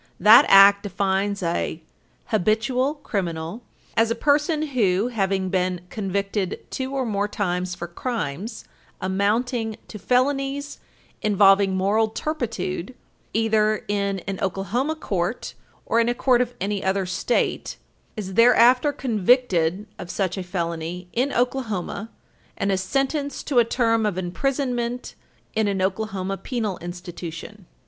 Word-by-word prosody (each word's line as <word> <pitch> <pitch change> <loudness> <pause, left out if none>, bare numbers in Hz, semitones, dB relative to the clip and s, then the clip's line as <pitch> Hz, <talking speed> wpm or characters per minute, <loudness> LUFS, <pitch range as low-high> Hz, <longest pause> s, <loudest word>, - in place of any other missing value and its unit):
That 215 +5 +8
Act 200 +1 +8
defines 200 0 -1
an 170 -1 -1 0.5
"habitual 225 - +1
criminal" 170 +1 -3 0.3
as 225 0 +3
a 230 - 0
person 295 +4 +1
who, 210 -4 +1
having 195 -4 0
been 180 -1 0
convicted 195 -1 -2
two 265 +1 -3
or 265 -1 0
more 205 -2 0
times 180 -4 -2
for 170 - -5
crimes 205 - -4 0.3
"amounting 220 +4 0
to 210 - -8
felonies 275 +5 0 0.4
involving 195 -2 +4
moral 205 +4 +2
turpitude," 225 - -4 0.4
either 215 -1 +2
in 200 -2 -1
an 195 +1 -5
Oklahoma 195 - -1
court 195 - -3 0.3
or 230 - +2
in 230 0 +2
a 240 - 0
court 250 -1 +3
of 245 0 -2
any 200 +1 -2
other 190 0 0
State, 185 +6 -1 0.4
is 190 -3 -5
thereafter 245 +5 +5
convicted 210 - +1
of 180 -2 -7
such 185 -1 -1
a 190 - -4
felony 175 0 -4
in 260 +4 +1
Oklahoma 225 -5 -2 0.5
and 200 - 0
is 190 -1 0
sentenced 275 +7 -1
to 270 -5 +3
a - - +6
term 230 -2 +1
of 195 -4 -2
imprisonment 245 +5 -2 0.4
in 220 -1 +1
an 200 -1 -1
Oklahoma 195 0 -2
penal 220 -6 -3
institution. 175 +3 -8
205 Hz, 130 wpm, -23 LUFS, 190-245 Hz, 0.5 s, That